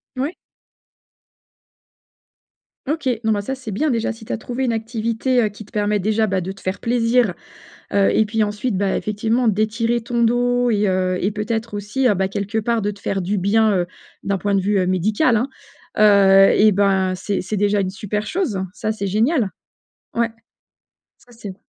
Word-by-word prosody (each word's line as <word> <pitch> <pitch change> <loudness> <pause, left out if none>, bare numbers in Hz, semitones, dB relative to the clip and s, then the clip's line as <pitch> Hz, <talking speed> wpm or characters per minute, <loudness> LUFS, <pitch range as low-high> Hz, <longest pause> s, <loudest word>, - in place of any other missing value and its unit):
Ouais. 275 +6 -2 2.5
OK, 285 -1 -1 0.2
non, 220 - +3
bah 205 - -1
ça 235 +6 -4
c'est 255 -4 -7
bien 300 +11 0
déjà 230 -1 -1
si 225 0 -14
tu - - -8
as - - -1
trouvé 245 +4 -4
une 250 - +1
activité, 230 +2 0
heu, 215 - +1
qui 205 +1 -12
te - - -22
permet 210 0 +1
déjà 215 +3 +1
bah 195 -2 0
de 185 +2 -5
te 195 - -17
faire 190 +2 -3
plaisir, 235 -3 +2 0.6
heu, 200 -1 +3
et 220 - +4
puis 215 0 0
ensuite 210 +2 -2
bah 195 -1 0
effectivement 225 +3 0
d'étirer 225 +3 0
ton 235 0 -1
dos 245 +1 +2
et 210 -2 +2
heu, 185 -1 0
et 200 - 0
peut-être 220 +1 -3
aussi 205 +6 -1
ben 190 0 0
quelque 200 +3 -3
part 230 +1 0
de 205 0 -1
te 200 - -15
faire 195 -1 -2
du 195 +3 -1
bien, 215 +3 +3
heu, 175 -1 0 0.4
d'un 200 0 -1
point 200 +2 -1
de 195 - +3
vue, 200 +1 +1
heu, 185 - +1
médical. 215 - +2 0.6
Heu, 195 -2 +6
eh 215 +1 +6
ben, 190 -1 +2
c'est 200 +2 -2
c'est 190 +3 -3
déjà 205 0 +2
une 190 -1 -1
super 210 +1 -4
chose, 290 - -1
ça 215 +2 -2
c'est 200 -2 -4
génial! 225 - +1 0.6
Ouais. 230 0 +1 0.9
Ça 245 - -21
c'est 210 -5 -8
215 Hz, 190 wpm, -20 LUFS, 200-230 Hz, 2.5 s, Heu